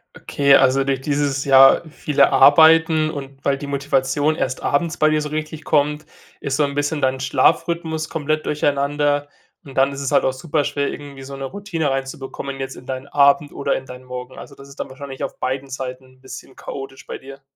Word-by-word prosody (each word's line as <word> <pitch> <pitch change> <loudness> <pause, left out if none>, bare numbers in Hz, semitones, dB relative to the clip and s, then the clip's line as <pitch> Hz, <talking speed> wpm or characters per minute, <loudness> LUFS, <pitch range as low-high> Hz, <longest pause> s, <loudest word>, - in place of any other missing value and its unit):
Okay, 140 -1 +3
also 135 +1 +4
durch 135 -1 -1
dieses, 140 -1 -1
ja, 135 0 +7
viele 145 -3 +2
Arbeiten 160 +2 +5
und 140 -2 -9
weil 140 -1 +2
die 145 - -7
Motivation 140 +2 0
erst 130 -4 -3
abends 160 +3 0
bei 155 0 +4
dir 155 0 +1
so 150 - -4
richtig 155 0 -5
kommt, 150 0 +1 0.3
ist 140 -1 -2
so 150 - +3
'n 140 0 -1
bisschen 145 +1 -1
dein 130 0 +1
Schlafrhythmus 160 +3 0
komplett 155 -1 -2
durcheinander 145 0 0 0.4
und 135 -2 -13
dann 135 +1 +3
ist 140 - -7
es 140 - -2
halt - - +3
auch 130 - +1
super 145 +2 -1
schwer, 145 0 -1
irgendwie 140 -2 -9
so 135 +1 -8
'ne 135 - -7
Routine 170 -5 -3
reinzubekommen 135 0 -5
jetzt 135 0 -5
in 125 - -13
deinen 130 +1 -5
Abend 140 +1 +3
oder 140 - -1
in 135 - -5
deinen 125 0 -11
Morgen. 125 0 -8
Also, 140 - -11
das 140 0 -14
ist 140 - -15
dann - - -4
wahrscheinlich 135 0 -8
auf - - -5
beiden 130 +1 -3
Seiten 130 0 -6
'n 130 0 -23
bisschen 130 0 -11
chaotisch 135 -1 -8
bei - - -6
dir? 135 +1 -12
140 Hz, 205 wpm, -20 LUFS, 135-150 Hz, 0.4 s, ja